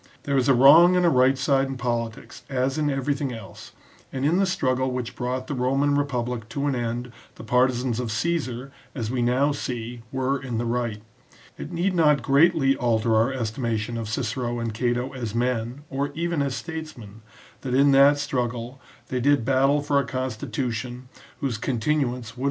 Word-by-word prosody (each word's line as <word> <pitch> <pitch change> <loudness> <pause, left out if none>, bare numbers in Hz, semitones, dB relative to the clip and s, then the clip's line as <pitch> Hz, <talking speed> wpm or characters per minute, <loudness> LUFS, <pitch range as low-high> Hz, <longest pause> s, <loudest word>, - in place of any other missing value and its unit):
There 140 - -1
is 135 0 +2
a 135 - +6
wrong 160 +8 +7
and 180 -1 +3
a - - +6
right 130 0 +4
side 135 0 +2
in 135 -1 -5
politics 120 -1 -4
as 135 +2 -1
in 150 -1 +1
everything 135 0 -1
else, 110 -5 -10 0.4
and 130 +1 -2
in 165 +4 +3
the 195 0 +2
struggle 130 -8 0
which 125 -2 -4
brought 125 +1 -3
the 145 - -4
Roman 135 +3 +1
republic 125 -5 -2
to 140 +5 -3
an 145 - +1
end 120 0 -3 0.2
the - - -10
partisans 125 0 +1
of 120 -3 -3
Caesar, 135 -1 -2 0.2
as 115 -3 -3
we 125 -1 -1
now 130 +4 +2
see, 120 -4 -5
were 130 +1 -1
in 125 -4 -4
the 120 - -1
right. 115 -3 -2 0.5
It 150 - -8
need 180 +3 0
not 150 -6 +3
greatly 140 0 +4
alter 115 -3 +1
our 115 +4 +3
estimation 115 -2 -2
of 115 -2 -4
Cicero 120 +2 -2
and 115 -2 -3
Cato 120 +3 -1
as 115 -4 -5
men, 120 +2 -1
or 140 +1 -2
even 170 -1 -1
as 140 -2 -1
statesmen, 155 - -8 0.4
that 130 -2 -2
in 140 +1 +5
that 140 +1 +6
struggle 125 -2 -3 0.3
they 130 - -1
did 140 -2 +2
battle 135 +2 +3
for 145 -1 +2
a - - +1
constitution 125 -1 -4 0.3
whose 125 -6 -2
continuance 135 +6 0
would 130 - +1
NOTE 120 - -4
ON 125 - -8
SALLUST. 115 +2 -11
130 Hz, 190 wpm, -24 LUFS, 120-140 Hz, 0.5 s, wrong